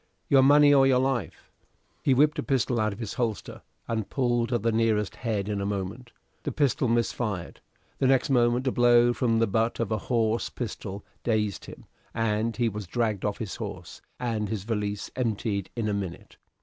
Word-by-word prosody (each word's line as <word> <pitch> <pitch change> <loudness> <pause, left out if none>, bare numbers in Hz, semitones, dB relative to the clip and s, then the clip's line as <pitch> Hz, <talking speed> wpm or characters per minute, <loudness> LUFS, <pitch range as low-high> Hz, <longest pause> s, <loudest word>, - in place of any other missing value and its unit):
"Your 135 -1 +6
money 145 +2 +6
or 135 -1 +6
your 130 -1 +4
life!" 130 -6 -2 0.5
He 135 - +3
whipped 150 +3 +3
a - - +1
pistol 130 -3 0
out 110 0 +1
of 100 - -8
his 110 -3 -5
holster, 115 -5 -3 0.3
and 110 -3 -2
pulled 120 -2 0
at 120 -4 0
the 115 - +2
nearest 110 -2 +1
head 110 -5 -2
in 105 -1 -2
a - - -2
moment. 100 +5 -4 0.3
The - - -3
pistol 135 -3 +1
missed 115 0 +1
fire. 105 -8 -3 0.5
The 135 - +3
next 135 +2 +3
moment 120 0 +3
a 130 - +2
blow 120 0 +5
from 120 -3 +1
the 115 - +3
butt 115 +3 0
end 115 - +1
of 100 - -11
a 110 - 0
horse 115 -2 +1
pistol 105 -4 -6 0.2
dazed 105 -3 -1
him, - - -12 0.3
and 115 0 0
he 120 -1 +2
was 105 -3 -5
dragged 110 -1 -1
off 105 -1 -1
his 110 -4 -5
horse, - - -7 0.2
and 115 -4 -2
his 105 -3 -3
valise 105 -2 -3
emptied 110 -5 -2
in 115 -3 -2
a 105 - 0
minute. 95 -3 -6
115 Hz, 200 wpm, -27 LUFS, 105-125 Hz, 0.5 s, Your